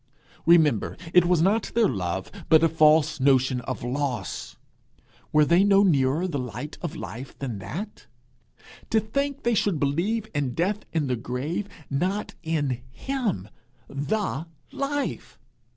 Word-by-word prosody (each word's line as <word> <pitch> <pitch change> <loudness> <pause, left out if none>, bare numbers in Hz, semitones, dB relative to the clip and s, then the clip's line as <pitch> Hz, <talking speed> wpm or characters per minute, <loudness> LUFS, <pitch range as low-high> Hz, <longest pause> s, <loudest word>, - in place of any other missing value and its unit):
Remember, 155 -10 +4 0.2
it 180 -1 +6
was 175 -2 +3
not 205 +4 +2
their 230 -2 +5
love, 95 - -3 0.2
but 160 0 +6
a - - +6
false 155 -1 +4
notion 130 -1 +3
of - - -5
loss. 130 -1 -3 0.7
Were 150 0 +5
they 170 +5 +4
no 200 0 +5
nearer 150 -1 +2
the 145 -6 -2
light 125 +5 -6
of 170 -2 -4
life 130 -3 -8
than 125 -7 -4
that? 195 - -7 0.8
To 220 - +4
think 280 +6 -2
they 235 - +2
should 200 -6 +1
believe 185 +11 0
in 135 -4 -1
death 195 +5 -1
and 155 -4 0
the 125 - 0
grave, 140 - -3 0.2
not 185 +9 -1
in 145 -7 -1
him, 215 - -3 0.4
the 160 +1 -2 0.2
Life! 285 +1 -3
160 Hz, 140 wpm, -25 LUFS, 135-200 Hz, 0.8 s, it